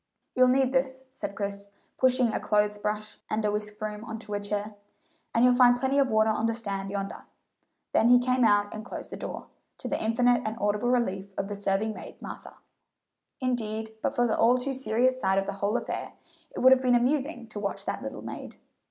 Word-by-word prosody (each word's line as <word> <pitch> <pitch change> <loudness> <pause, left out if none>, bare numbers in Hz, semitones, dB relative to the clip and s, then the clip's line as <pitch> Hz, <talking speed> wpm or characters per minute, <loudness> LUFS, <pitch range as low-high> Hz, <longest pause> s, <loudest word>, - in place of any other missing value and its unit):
"You'll 255 0 +5
need 260 0 +3
this," 265 0 -1
said 200 - -5
Chris, 200 0 -4 0.3
pushing 255 -3 +3
a - - 0
clothes 210 0 +1
brush 210 +1 -3
and 215 0 -1
a 210 - +2
whisk 210 0 -4
broom 215 0 -5
on 225 -2 -6
to 215 -2 -8
a 205 - 0
chair, 205 +1 -3 0.6
"and 230 +2 +4
you'll 250 - +6
find 245 -1 +6
plenty 265 +3 +1
of 275 - +4
water 220 0 +3
on 220 +1 0
the 230 - 0
stand 200 -4 -3
yonder;" 200 0 -5 0.7
then 225 - +4
he 245 - +8
came 255 0 +2
out 205 -2 +3
and 215 - -6
closed 245 - -8
the - - -4
door, - - -7 0.3
to - - -6
the - - -2
infinite 245 +2 +3
and 215 +1 -3
audible 210 +3 +1
relief 200 -6 -1
of 195 - -2
the 205 - -3
serving 200 +2 0
maid - - -10
Martha. - - -9 0.9
Indeed 220 -3 -2
but - - -1
for 245 - +3
the 225 - +1
all 245 +2 +4
too 270 +2 -2
serious 255 0 +1
side 190 0 +2
of 195 - +2
the 200 - -3
whole 205 +3 +1
affair, - - -5 0.4
it - - -6
would 260 +1 +7
have 260 -1 +6
been 250 -1 +3
amusing 260 0 0
to 215 - -6
watch 200 -1 -4
that - - -3
little - - -6
maid. - - -7
220 Hz, 215 wpm, -28 LUFS, 210-250 Hz, 0.9 s, he